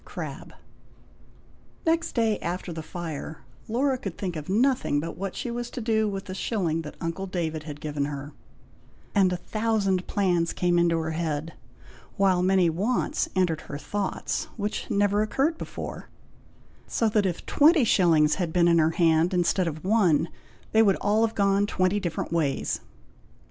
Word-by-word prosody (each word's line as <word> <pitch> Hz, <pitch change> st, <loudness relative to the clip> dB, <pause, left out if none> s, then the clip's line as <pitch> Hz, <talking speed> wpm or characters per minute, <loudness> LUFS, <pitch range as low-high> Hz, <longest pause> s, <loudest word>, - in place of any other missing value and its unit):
Crabbe. -, -, -7 dB, 1.3 s
Next 330 Hz, 0 st, +1 dB
day 225 Hz, -3 st, +1 dB
after 175 Hz, 0 st, -4 dB
the 160 Hz, -, -5 dB
fire, 160 Hz, -2 st, -6 dB, 0.2 s
Laura 255 Hz, +3 st, +1 dB
could 195 Hz, -7 st, -6 dB
think 180 Hz, -3 st, -3 dB
of 155 Hz, +1 st, -6 dB
nothing 235 Hz, -, +2 dB
but 165 Hz, +2 st, -5 dB
what 195 Hz, +2 st, -5 dB
she 240 Hz, -, -4 dB
was 240 Hz, 0 st, -4 dB
to -, -, -6 dB
do 220 Hz, -2 st, +1 dB
with 195 Hz, -1 st, -5 dB
the 185 Hz, -, -6 dB
shilling 185 Hz, -5 st, -1 dB
that 150 Hz, -2 st, -9 dB
uncle 170 Hz, +3 st, -3 dB
David 165 Hz, -4 st, -2 dB
had 150 Hz, -2 st, -7 dB
given 150 Hz, -2 st, -2 dB
her; 145 Hz, 0 st, -6 dB, 0.8 s
and 195 Hz, -3 st, +4 dB
a 180 Hz, -, -1 dB
thousand 205 Hz, -2 st, 0 dB
plans 175 Hz, -4 st, +1 dB
came 175 Hz, -1 st, +2 dB
into 170 Hz, -1 st, +3 dB
her 160 Hz, 0 st, -2 dB
head, 160 Hz, -1 st, -2 dB, 0.6 s
while 190 Hz, -3 st, +3 dB
many 185 Hz, -1 st, +4 dB
wants 200 Hz, +10 st, 0 dB
entered 175 Hz, -4 st, +1 dB
her 140 Hz, -, -7 dB
thoughts, 200 Hz, +6 st, -3 dB
which 210 Hz, -1 st, -3 dB
never 205 Hz, +1 st, +2 dB
occurred 275 Hz, +9 st, 0 dB
before; -, -, -7 dB, 0.8 s
so 230 Hz, -, +1 dB
that, 210 Hz, -2 st, +2 dB
if 175 Hz, -, -4 dB
twenty 305 Hz, 0 st, +5 dB
shillings 165 Hz, -8 st, +4 dB
had 170 Hz, -2 st, -1 dB
been 175 Hz, 0 st, +3 dB
in 170 Hz, -1 st, +5 dB
her 155 Hz, 0 st, +4 dB
hand 165 Hz, +1 st, +3 dB
instead 180 Hz, +1 st, +2 dB
of 155 Hz, +1 st, -5 dB
one, 185 Hz, -6 st, +3 dB, 0.4 s
they 220 Hz, -, +5 dB
would 200 Hz, -3 st, +4 dB
all 210 Hz, +2 st, +2 dB
have 225 Hz, 0 st, 0 dB
gone 200 Hz, 0 st, +2 dB
twenty 185 Hz, 0 st, +1 dB
different 175 Hz, -3 st, -3 dB
ways. 145 Hz, -5 st, 0 dB
185 Hz, 165 wpm, -26 LUFS, 165-210 Hz, 1.3 s, twenty